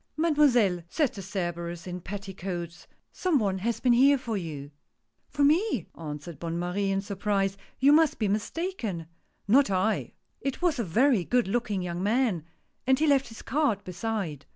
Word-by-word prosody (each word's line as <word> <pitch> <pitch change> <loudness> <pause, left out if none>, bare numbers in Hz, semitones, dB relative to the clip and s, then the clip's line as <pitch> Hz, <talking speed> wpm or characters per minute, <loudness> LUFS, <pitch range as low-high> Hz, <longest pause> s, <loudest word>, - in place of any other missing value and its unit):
" - - -47
Mademoiselle! 275 - +3
" - - -40
said 300 -6 +2
the 200 - -7
Cerberus 175 -3 -4
in 180 0 -6
petticoats, 185 -3 -6
" - - -42
some 360 -5 +1
one 195 -5 0
has 230 +4 -1
been 250 -2 +3
here 275 +4 +6
for 235 -4 -4
you." 150 -6 -5 0.6
"For 290 - 0
me?" 305 - +3
answered 150 -1 -7
Bonne 170 0 -3
Marie, 180 +3 -1
in 195 0 +1
surprise; 195 -1 -1
" - - -32
you 280 +2 +6
must 320 -1 +4
be 215 - 0
mistaken! 215 - -2
" - - -44
" - - -45
Not 265 +5 +5
I! 195 +3 0 0.3
It 275 -1 -3
was 345 -7 +1
a - - +1
very 225 - +3
good 245 +2 +1
looking 205 -3 -1
young 175 0 -3
man, 210 - +1 0.4
and 265 0 +5
he 315 - +2
left 275 -3 +3
his 225 -1 -11
card 270 -9 0
beside." 180 - -4
205 Hz, 190 wpm, -28 LUFS, 180-265 Hz, 0.6 s, here